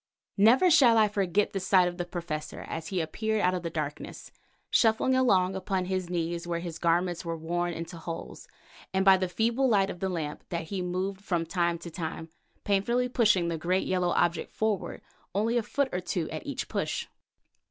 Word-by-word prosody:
Never 250 - +6
shall 255 -8 +6
I 215 -1 +5
forget 200 -1 0
the 195 - -1
sight 185 -1 +4
of 175 +1 -5
the 175 - -1
Professor 170 -3 -5
as 160 -1 -6
he 190 - -2
appeared 220 +7 -1
out 180 -1 +3
of 180 - -2
the 170 - -3
darkness, 150 -3 -5 0.4
shuffling 225 +3 +3
along 195 -8 +3
upon 190 -1 -2
his 185 -1 -2
knees 170 0 -2
where 170 -1 -1
his 170 -1 -6
garments 175 0 +1
were 165 -1 -3
worn 175 +2 -2
into 170 +1 -6
holes, 165 0 -7 0.5
and 190 0 +2
by 195 -1 +8
the 185 -1 -1
feeble 235 +7 +1
light 195 -3 +3
of 175 - -9
the 190 - -1
lamp 155 -4 -4
that 170 -2 -4
he 195 -2 -2
moved 185 +2 -3
from 175 -4 -1
time 170 0 0
to 170 0 -9
time, 160 -1 -5 0.3
painfully 235 +5 +1
pushing 210 -8 +3
the 165 -1 -2
great 185 +4 0
yellow 180 -1 +1
object 170 -1 +1
forward, 215 -4 -2 0.3
only 220 +4 +1
a 240 - +3
foot 280 +4 -1
or 180 - 0
two 175 -2 -2
at - - -6
each - - -3
push. - - -2
180 Hz, 195 wpm, -28 LUFS, 170-205 Hz, 0.5 s, by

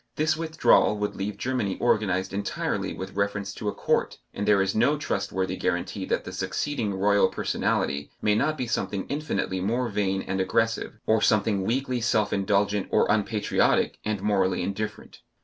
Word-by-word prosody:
This 155 0 +2
withdrawal 160 -9 +3
would 105 0 -2
leave 100 +1 -4
Germany 120 -7 -1
organized 95 -5 +1
entirely 100 +1 -2
with 95 - -6
reference 100 0 -2
to 105 - -6
a - - -1
Court, - - 0 0.2
and 100 - -3
there 105 -1 +5
is 95 - -1
no 125 +7 +3
trustworthy 95 -9 -2
guarantee - - -2
that - - -1
the - - -7
succeeding 125 -8 -2
Royal 100 0 +4
Personality 70 +1 -1
may 105 - +2
not 155 +8 +1
be 130 - -2
something 100 -4 -2
infinitely 140 -10 -2
more 120 +6 0
vain 95 -2 0
and 95 0 -2
aggressive, 115 +5 0
or 110 0 +3
something 105 -3 +2
weakly 125 +1 -1
self 110 -2 +1
indulgent 100 0 +1
or - - +3
unpatriotic 105 0 +1
and 105 -2 -2
morally 95 -4 +1
indifferent. 105 +3 -5
105 Hz, 165 wpm, -26 LUFS, 95-115 Hz, 0.2 s, there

